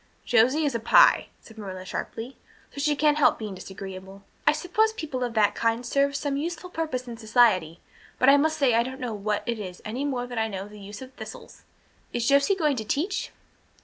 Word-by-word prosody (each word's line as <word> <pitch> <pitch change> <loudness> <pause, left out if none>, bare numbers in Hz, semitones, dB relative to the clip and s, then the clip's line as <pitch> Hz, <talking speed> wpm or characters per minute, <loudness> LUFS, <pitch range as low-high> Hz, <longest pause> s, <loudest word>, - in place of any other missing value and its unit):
"Josie 255 +7 +3
is 285 - 0
a 230 - -1
Pye," 225 - +5
said 225 -1 -15
Marilla 185 -2 -7
sharply, 225 +6 -6 0.4
"so 280 - -5
she 295 0 +2
can't 300 +1 +2
help - - +4
being 215 -3 -6
disagreeable. 190 +1 -9 0.2
I - - +8
suppose 360 +8 +1
people 295 - -4
of 240 -2 -3
that 205 -2 +3
kind 230 +2 0
serve 280 +3 +1
some 285 -1 -1
useful 340 +4 -4
purpose 300 -7 -3
in 235 -1 -7
society, 215 -8 +2 0.4
but 255 - +2
I 275 - +8
must 315 +2 +2
say 270 -4 +3
I 230 - +4
don't 260 +2 -5
know 245 -3 -3
what 210 0 -2
it 235 -2 -2
is 185 -3 -7
any 240 +6 -3
more 260 -4 -2
than 245 -2 -4
I 220 - +1
know 195 -2 -6
the 210 0 -13
use 205 +4 -9
of 260 0 -13
thistles. - - -11 0.5
Is 235 -1 -1
Josie 280 +7 +4
going 305 -7 +1
to 220 - -2
teach?" 320 - -2
245 Hz, 210 wpm, -26 LUFS, 210-285 Hz, 0.5 s, I